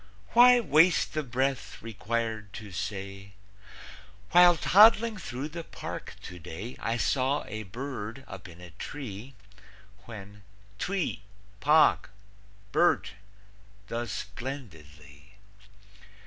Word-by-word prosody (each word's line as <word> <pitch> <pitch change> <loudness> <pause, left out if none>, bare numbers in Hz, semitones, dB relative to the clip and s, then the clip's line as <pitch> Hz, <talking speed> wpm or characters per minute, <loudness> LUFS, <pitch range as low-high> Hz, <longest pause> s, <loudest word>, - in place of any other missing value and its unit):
Why 245 +1 +7
waste 170 -3 +4
the 155 - 0
breath 130 -3 -2
required 110 -1 -4
to 105 -3 -9
say, 100 0 -6 1.0
"While 175 -1 +7
toddling 220 +5 +6
through 135 -3 -5
the 165 +2 -6
park - - -7
today, 90 +6 -8
I 115 +1 -1
saw 135 +3 +1
a 110 - -5
bird 120 +3 -6
up 95 0 -9
in 85 0 -14
a 90 -1 -11
tree," 125 - -8 0.7
When 105 -2 -10 0.4
"Twee, 185 - -2 0.4
pahk, 155 -3 +4 0.6
birt," 105 - +2 0.8
does 115 -1 -4
splendidly? 90 - -8
115 Hz, 100 wpm, -28 LUFS, 100-150 Hz, 1.0 s, Why